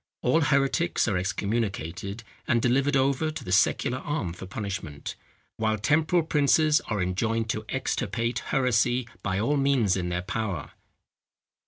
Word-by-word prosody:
All 155 +7 +3
heretics 140 +3 +2
are 105 - +1
excommunicated, 100 0 -2 0.2
and 120 -3 +3
delivered 135 +4 +2
over 135 +3 +2
to 155 -3 -6
the 90 - -6
secular 110 +6 +2
arm 130 - -3
for 90 +2 -9
punishment; 95 -7 -5 0.4
while 110 -1 +1
temporal 155 +9 +2
princes 155 0 +3
are 105 -4 0
enjoined 110 +5 0
to 110 0 -4
extirpate 120 -2 -1
heresy 125 -1 +2
by 95 0 -1
all 145 +8 +1
means 135 -8 +2
in 90 -2 -2
their 90 0 -2
power. 100 -7 -3
115 Hz, 140 wpm, -27 LUFS, 100-140 Hz, 0.4 s, All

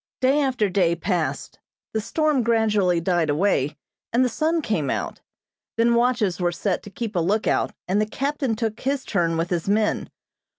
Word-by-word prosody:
Day 270 +2 +3
after 255 -6 +1
day 180 -3 +2
passed. 175 -1 -2 0.3
The 220 - 0
storm 305 +4 +1
gradually 215 -6 +2
died 170 -2 +1
away, 150 -3 +1 0.3
and 245 +2 +3
the - - +1
sun 320 +4 0
came 160 - -1
out. - - -3 0.6
Then 235 +1 +4
watches 235 -6 +1
were 175 0 +2
set 180 +2 -1
to - - -11
keep 220 +1 -5
a - - +2
lookout, 200 +6 +1 0.2
and 195 +3 +2
the 215 - 0
captain 275 0 -1
took 220 -1 -3
his 275 +1 -1
turn 170 -4 0
with 165 +2 -2
his 175 +1 -1
men. 210 +1 +1
210 Hz, 175 wpm, -23 LUFS, 175-245 Hz, 0.6 s, Then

